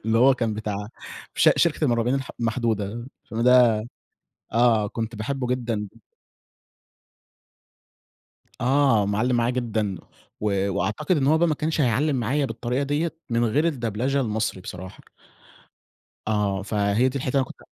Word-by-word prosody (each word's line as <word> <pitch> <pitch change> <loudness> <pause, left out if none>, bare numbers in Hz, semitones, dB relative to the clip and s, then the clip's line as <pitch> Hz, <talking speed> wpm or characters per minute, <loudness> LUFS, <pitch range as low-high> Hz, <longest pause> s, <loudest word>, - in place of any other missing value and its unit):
اللي 110 +1 +2
هو 130 +2 +6
كان 115 -4 -1
بتاع 105 -1 -4 0.5
ش - - +6
شركة 165 -2 +2
المُرعبين 120 0 +1
الح 135 -1 -3
المحدودة، 115 -1 -1 0.2
فيلم 110 +2 -5
ده 125 -2 +6 0.8
آه، 115 -3 +3
كنت 115 +1 -4
باحبه 125 +4 -3
جدًا 115 -4 -2 2.7
آه، 130 -4 +3
معلِّم 110 +5 +1
معايا 120 0 +2
جدًا، 110 -6 -2 0.4
و 100 -2 0
وأعتقد 110 - 0
إن 135 - +1
هو 155 +2 +4
بقى 170 - +3
ما 155 - +1
كانش 155 +1 -1
هيعلِّم 135 +4 +2
معايا 135 +4 0
بالطريقة 125 +3 -2
دِيَّة 150 +4 -1 0.2
من 120 0 +1
غير 145 +9 +1
الدبلجة 130 0 -1
المصري 110 -5 -2
بصراحة. 90 +1 -9 1.3
آه 105 -3 0
فهي 105 +4 +1
دي 140 - -4
الحتة 130 -1 -3
اللي 130 - +2
أنا - - -7
كنت - - -14
120 Hz, 140 wpm, -24 LUFS, 105-135 Hz, 2.7 s, هو